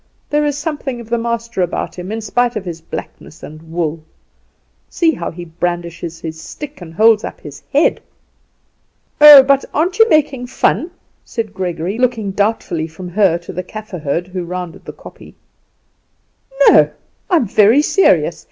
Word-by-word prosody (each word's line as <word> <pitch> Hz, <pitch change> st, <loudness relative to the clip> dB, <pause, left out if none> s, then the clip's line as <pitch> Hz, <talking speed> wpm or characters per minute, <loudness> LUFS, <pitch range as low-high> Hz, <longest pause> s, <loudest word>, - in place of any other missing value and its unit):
There 295 Hz, 0 st, +2 dB
is 290 Hz, -1 st, -2 dB
something 290 Hz, -5 st, -4 dB
of 230 Hz, -1 st, -12 dB
the 235 Hz, -, +1 dB
master 235 Hz, -3 st, -3 dB
about 175 Hz, -, -2 dB
him 180 Hz, +2 st, -7 dB
in 225 Hz, +1 st, -3 dB
spite 240 Hz, +3 st, 0 dB
of 210 Hz, -3 st, -4 dB
his 170 Hz, -2 st, -6 dB
blackness 160 Hz, -1 st, -9 dB
and 155 Hz, +1 st, -10 dB
wool. 165 Hz, -2 st, -3 dB, 0.9 s
See 330 Hz, -2 st, +2 dB
how 280 Hz, -, -4 dB
he 175 Hz, +1 st, -9 dB
brandishes 170 Hz, 0 st, -4 dB
his 160 Hz, -1 st, -7 dB
stick 295 Hz, -, -9 dB
and 170 Hz, -2 st, -9 dB
holds 220 Hz, +2 st, +4 dB
up -, -, -7 dB
his 150 Hz, 0 st, -10 dB
head!" 290 Hz, +3 st, +2 dB, 1.2 s
"Oh, 295 Hz, -2 st, +11 dB
but 275 Hz, 0 st, +2 dB
aren't 360 Hz, +7 st, 0 dB
you 450 Hz, 0 st, +6 dB
making 275 Hz, -6 st, +1 dB
fun?" 315 Hz, +5 st, 0 dB, 0.3 s
said 220 Hz, -3 st, -5 dB
Gregory, 185 Hz, +2 st, -3 dB
looking 230 Hz, -5 st, 0 dB
doubtfully 200 Hz, -5 st, -1 dB
from 175 Hz, +3 st, -9 dB
her 185 Hz, -2 st, +2 dB
to 170 Hz, -, -10 dB
the 185 Hz, -, -3 dB
Kaffer 210 Hz, 0 st, -8 dB
herd, 150 Hz, +3 st, -2 dB
who 185 Hz, -1 st, -4 dB
rounded 180 Hz, -1 st, -7 dB
the -, -, -8 dB
kopje. -, -, -14 dB, 1.3 s
"No; -, -, +6 dB, 0.4 s
I 365 Hz, -, +3 dB
am 315 Hz, -, +3 dB
very 220 Hz, +8 st, +4 dB
serious. 390 Hz, -, +2 dB
205 Hz, 165 wpm, -17 LUFS, 175-255 Hz, 1.3 s, Oh